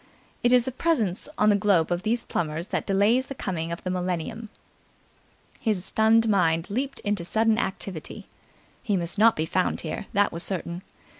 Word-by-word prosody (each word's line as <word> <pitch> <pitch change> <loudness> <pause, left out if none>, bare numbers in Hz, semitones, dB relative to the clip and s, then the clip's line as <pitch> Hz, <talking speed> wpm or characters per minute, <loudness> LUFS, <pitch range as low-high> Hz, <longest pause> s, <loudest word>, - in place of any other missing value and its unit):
It 240 - +3
is 250 -1 +5
the 260 - -4
presence 255 - 0
on 210 0 +4
the - - +4
globe 195 -5 +2
of 175 0 0
these 230 +3 -1
Plummers 160 +2 -3
that - - -2
delays 210 +6 +3
the 275 - -6
coming 170 -7 -3
of 170 - -5
the 185 - -2
Millennium. 185 +5 -3 1.1
His 205 -5 -1
stunned 220 +3 +3
mind 170 -4 +2
leaped 270 +5 -2
into 205 -4 -1
sudden 220 +5 +2
activity. 190 -5 -5 0.6
He 205 -5 0
must 170 +2 -3
not 225 +1 +6
be 155 - -1
found 185 +3 0
here, 165 +5 -5
that 205 -1 +3
was 170 - -4
certain. 175 -1 -2
200 Hz, 175 wpm, -25 LUFS, 175-225 Hz, 1.1 s, not